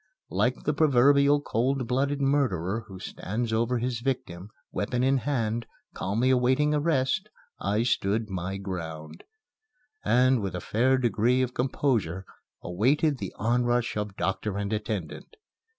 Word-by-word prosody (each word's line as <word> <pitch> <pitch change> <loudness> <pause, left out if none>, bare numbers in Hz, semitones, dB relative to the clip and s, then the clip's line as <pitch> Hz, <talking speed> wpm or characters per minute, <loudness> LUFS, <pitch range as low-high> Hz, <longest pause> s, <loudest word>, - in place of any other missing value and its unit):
Like 110 +8 0
the 150 - +1
proverbial 140 0 +4
cold 130 0 0
blooded 140 +3 0
murderer 115 - 0
who 95 - -9
stands 110 +5 -4
over 120 +2 +1
his 120 0 -2
victim, 105 -8 -3 0.2
weapon 125 +4 -1
in 135 +1 +3
hand, 120 -4 -1 0.3
calmly 115 +7 0
awaiting 130 +4 +3
arrest, 150 +5 +1 0.3
I 105 +3 0
stood 110 -2 0
my 95 0 -4
ground, 80 -5 -6 0.8
and, 125 +2 +3
with 95 -2 -3
a - - -2
fair 125 +9 +2
degree 120 +1 +2
of 125 -1 -3
composure, 115 - 0 0.4
awaited 135 - +1
the 95 - -4
onrush 120 +1 +1
of 105 -2 -3
doctor 100 +1 -2
and 100 +1 -2
attendant. 105 - -4
120 Hz, 135 wpm, -27 LUFS, 100-130 Hz, 0.8 s, proverbial